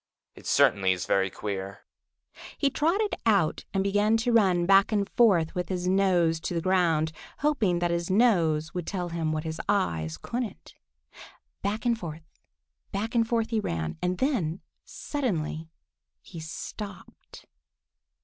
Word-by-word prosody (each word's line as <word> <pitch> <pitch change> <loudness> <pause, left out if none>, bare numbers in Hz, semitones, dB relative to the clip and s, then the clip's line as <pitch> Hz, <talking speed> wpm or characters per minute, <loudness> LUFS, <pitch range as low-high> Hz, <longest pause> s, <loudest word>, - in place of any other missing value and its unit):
It - - -12
certainly 95 -2 +4
is 90 0 -4
very 95 -1 +2
queer." 100 0 -5 0.8
He 280 - +1
trotted 380 +10 +1
out 200 -8 +2
and 195 -1 0
began 205 +3 +2
to 245 - +2
run 190 -6 +4
back 195 +3 +5
and 205 -2 +1
forth 190 -10 +3
with 180 -3 -3
his 180 -1 -2
nose 180 -4 +3
to 175 - -4
the - - +1
ground, 165 -3 +2 0.3
hoping 250 -12 +2
that 175 0 0
his 170 +1 -1
nose 170 -8 +2
would 180 -2 -4
tell 180 -3 -3
him 165 -2 -2
what 155 0 -2
his 160 0 -4
eyes 80 - 0
couldn't. 235 - -5 0.9
Back 210 +3 -2
and 235 -1 +3
forth, 165 -6 -7 0.7
back 220 +3 -3
and 230 -2 +2
forth 230 -1 0
he 225 - +1
ran, 80 - -3
and 180 0 0
then 195 - 0 0.2
suddenly 165 - -3 0.5
he 170 - -10
stopped. 190 +4 -9
180 Hz, 150 wpm, -27 LUFS, 160-215 Hz, 0.9 s, back